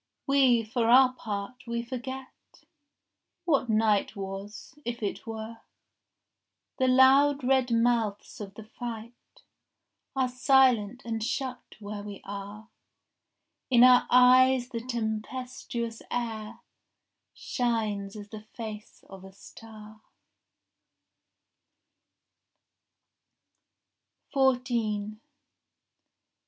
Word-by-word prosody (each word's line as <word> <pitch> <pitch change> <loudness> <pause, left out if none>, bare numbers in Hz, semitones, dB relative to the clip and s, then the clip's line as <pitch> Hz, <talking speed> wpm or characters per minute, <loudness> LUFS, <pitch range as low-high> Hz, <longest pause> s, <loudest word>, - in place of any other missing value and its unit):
We, 265 -4 +4
for 230 +1 -1
our 255 +1 +6
part, 215 +1 -6
we 235 0 -2
forget 260 +2 -9 0.8
What 280 -7 +1
night 215 -1 +2
was, 195 +1 -7
if 235 -1 -5
it 205 - -4
were. 225 0 -6 1.2
The 260 - +3
loud 270 +2 +5
red 260 -1 +2
mouths 230 -3 0
of 200 -1 -8
the 220 - -9
fight 235 +1 -9 0.7
Are 260 -1 +1
silent 250 -3 +3
and 225 -2 -3
shut 255 +1 -4
where 205 0 -7
we 205 -1 -8
are. 205 +2 -8 1.0
In 245 -2 +6
our 250 -1 +6
eyes 255 0 +5
the 235 -3 -4
tempestuous 235 0 -4
air 225 -1 -4 0.7
Shines 215 -5 -2
as 205 -1 -9
the 215 0 -9
face 215 -1 -9
of 190 -1 -12
a 190 - -12
star. 215 +2 -14
230 Hz, 90 wpm, -28 LUFS, 215-255 Hz, 1.2 s, our